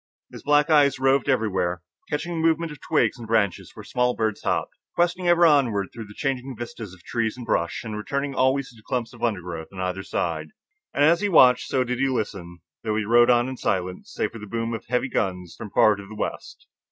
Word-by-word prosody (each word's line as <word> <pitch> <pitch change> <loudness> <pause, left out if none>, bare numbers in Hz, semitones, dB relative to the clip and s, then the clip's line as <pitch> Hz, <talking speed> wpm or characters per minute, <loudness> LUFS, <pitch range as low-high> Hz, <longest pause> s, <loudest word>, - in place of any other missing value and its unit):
His - - -10
black 145 +2 +3
eyes 140 -3 +5
roved 135 +1 +2
everywhere, 95 -8 0 0.3
catching 155 +4 -2
the 165 0 +1
movements 165 0 +1
of 150 - -11
twigs - - +1
and 115 - -8
branches 110 -5 0
where - - -9
small 125 0 0
birds 110 -2 -1
hopped, - - -1 0.2
questing 175 +1 +1
ever 175 0 +5
onward 125 - +3
through 115 -2 -8
the 105 - -13
changing 135 -2 -3
vistas 115 -4 -7
of 85 - -22
trees 115 -1 -2
and 125 - -7
brush, 85 -5 -1
and 110 -2 -5
returning 140 +8 -3
always 130 +1 +1
to - - -19
the 110 - -17
clumps 120 +1 -3
of 120 - -14
undergrowth 90 -8 -2
on 95 - -10
either 95 0 -2
side. 80 -4 -2 0.4
And 145 - +1
as 170 +3 +5
he 205 - +1
watched, 125 -8 +6
so 130 - +1
did 125 0 -3
he 135 - +2
listen, 95 -9 -4 0.2
though 110 -2 -1
he 105 -1 -1
rode 120 +2 +5
on 120 0 +4
in 130 0 -5
silence, 90 -4 -2
save - - -2
for 115 - -9
the 105 - -9
boom 115 +2 -3
of 115 - -6
heavy 125 +2 0
guns 90 -7 -2
from 105 - -8
far 105 +1 +4
to 100 -1 -10
the 110 - -10
west. - - -5
120 Hz, 225 wpm, -24 LUFS, 100-135 Hz, 0.4 s, watched